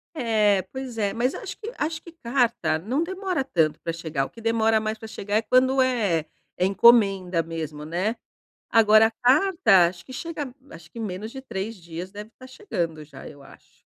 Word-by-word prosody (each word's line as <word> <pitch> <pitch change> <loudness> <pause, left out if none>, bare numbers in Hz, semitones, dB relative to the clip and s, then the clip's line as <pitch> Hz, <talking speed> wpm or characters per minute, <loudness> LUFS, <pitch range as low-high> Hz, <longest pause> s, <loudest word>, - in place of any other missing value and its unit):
É, 215 -7 +2
pois 260 -3 -6
é. 200 -2 +1
Mas 245 +3 0
acho - - -7
que 450 +1 -6
acho 320 +1 -2
que 340 - -12
carta 235 - 0
não 245 - -1
demora 375 -3 -2
tanto 160 - 0
pra 165 - -3
chegar, 160 -4 -3
o - - -10
que 230 - -14
demora 225 -1 +2
mais 215 0 -3
pra 220 - -8
chegar 205 -1 -4
é - - +2
quando 260 +3 +3
é 210 -11 +1 0.3
é 180 - +1
encomenda 195 -4 +4
mesmo, 160 -2 -6
né. 180 +9 -2 0.5
Agora, 220 0 +6
a - - -1
carta, 260 - +4
acho 175 -1 -11
que 260 - -11
chega 295 -3 -5 0.2
acho 160 -1 -13
que, 235 - -11
menos 210 0 -5
de 265 +2 -8
3 220 -3 -5
dias, 170 +1 -8
deve 210 +2 -9
estar 255 +3 -15
chegando 170 - -4
já, 140 -2 -11
eu 145 -2 -14
acho. - - -19
220 Hz, 195 wpm, -24 LUFS, 175-255 Hz, 0.5 s, Agora